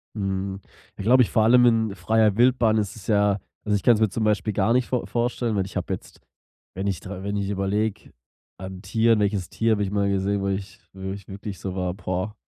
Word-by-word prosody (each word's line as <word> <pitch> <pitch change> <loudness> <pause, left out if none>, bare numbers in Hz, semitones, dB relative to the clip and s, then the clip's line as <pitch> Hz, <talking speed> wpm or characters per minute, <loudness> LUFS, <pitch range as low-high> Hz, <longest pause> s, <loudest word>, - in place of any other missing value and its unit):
Hm. 95 -1 -3 0.4
Ich 100 - -5
glaube, 125 +3 +6
ich - - -3
vor 110 - +2
allem 125 +2 +6
in 110 -4 +2
freier 110 +2 +2
Wildbahn 120 -3 +4
ist 105 -1 -2
es 100 -4 -12
ja 105 -2 +2 0.3
also, 105 -1 +1
ich 100 - 0
kann 120 - +6
es - - -2
mir 110 -2 +3
zum 110 +4 -2
Beispiel 105 0 +1
gar 110 +4 +2
nicht 125 0 +2
vor 125 -2 -2
vorstellen, 120 -2 -1
weil 95 -1 0
ich 95 - -11
hab - - -3
jetzt - - -6 0.5
wenn 95 +2 -3
ich 95 -4 -1
dr 95 0 -7
wenn 100 0 -3
ich 100 0 -2
überlege 100 +2 -2 0.5
an 95 0 -8
Tieren, 110 +2 +2
welches 100 -3 0
Tier 115 0 0
habe 105 -1 0
ich 100 - -3
mal 100 -1 +1
gesehen, 100 +1 0
wo 100 - -1
ich 100 +1 -4
wo 95 0 -6
ich 100 -1 -8
wirklich 100 0 -7
so 95 -1 -5
war: 90 -1 -1
„Boah, 95 +2 -4
100 Hz, 235 wpm, -24 LUFS, 95-110 Hz, 0.5 s, glaube